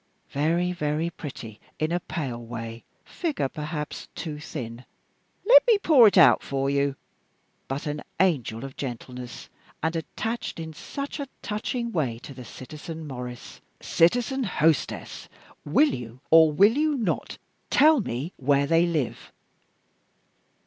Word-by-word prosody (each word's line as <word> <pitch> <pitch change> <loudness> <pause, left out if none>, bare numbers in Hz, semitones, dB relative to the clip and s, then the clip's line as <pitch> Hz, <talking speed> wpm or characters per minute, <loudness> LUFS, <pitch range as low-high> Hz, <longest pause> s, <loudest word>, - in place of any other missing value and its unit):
Very, 170 +5 +1
very 155 0 -1
pretty 115 -9 -8 0.2
in 155 +1 -1
a 175 - +1
pale 130 -9 -4
way; 115 0 -7 0.2
figure 310 - -2
perhaps 150 +1 -5
too 150 -3 -5
thin 120 -4 -7 0.6
let - - +10
me 460 -3 +6
pour 295 - +7
it 200 - +3
out 175 - +7
for 135 0 -1
you 140 -1 +1 0.7
but 135 +2 -4
an 150 0 -3 0.2
angel 135 - +1
of 135 - -9
gentleness, 125 -1 -7 0.4
and 160 +1 0
attached 220 +7 -4
in 160 -1 -6
such 280 - -6
a 280 - -3 0.2
touching 235 +3 -2
way 135 - -1
to 135 +4 -10
the 130 -1 -9
citizen 155 +7 -8
Maurice 125 -2 -8
" - - -42 0.2
"Citizen 245 +10 +3
hostess, 165 - 0 0.4
will 285 - +4
you, 120 0 -7
or 160 -1 +8
will 200 +9 +5
you 305 0 +2
not, 215 -9 -2 0.3
tell 305 0 +6
me 140 - -4
where 140 +1 +2
they 165 +3 +3
live?" 155 -8 -2
155 Hz, 140 wpm, -26 LUFS, 135-185 Hz, 0.7 s, let